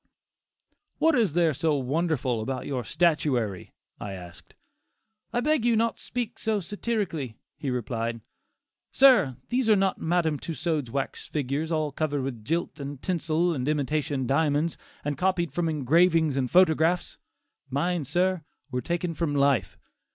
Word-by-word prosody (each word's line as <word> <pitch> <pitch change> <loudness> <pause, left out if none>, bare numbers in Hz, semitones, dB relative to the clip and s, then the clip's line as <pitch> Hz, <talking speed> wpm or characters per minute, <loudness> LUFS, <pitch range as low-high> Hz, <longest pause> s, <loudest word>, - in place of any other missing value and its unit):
"What 325 0 +4
is 225 - +2
there 170 -2 +3
so 155 +2 +1
wonderful 135 -3 0
about 130 +2 -3
your 130 -3 -2
statuary?" 130 - 0 0.3
I 100 -1 -5
asked. 90 -2 -11 0.8
"I 240 - 0
beg 300 -2 +2
you 235 -1 +3
not 230 +1 +1
to - - -12
speak 245 -2 -4
so 220 -2 0
satirically," 190 - -3 0.2
he 140 - -4
replied, 115 -1 -2 0.7
"Sir, 250 - +5
these 245 -2 +1
are 215 - +7
not 195 -1 +1
Madam 160 -3 +1
Tussaud's 160 -5 -2
wax 135 +3 -4
figures, 150 +3 -2
all 155 -2 0
covered 145 -1 -1
with 125 -5 -5
gilt 165 +4 -2
and 140 -1 -6
tinsel 170 0 0
and 130 -3 -3
imitation 145 -2 0
diamonds, 150 +4 +1 0.3
and 145 -1 -2
copied 180 -2 +1
from 175 -2 0
engravings 160 +1 +3
and 130 -2 0
photographs. 175 -1 +3 0.5
Mine, 170 +4 0
sir, 180 +5 +1 0.3
were 125 -1 -1
taken 170 +2 -2
from 155 -2 -1
life. 140 -9 +2
155 Hz, 145 wpm, -27 LUFS, 135-175 Hz, 0.8 s, are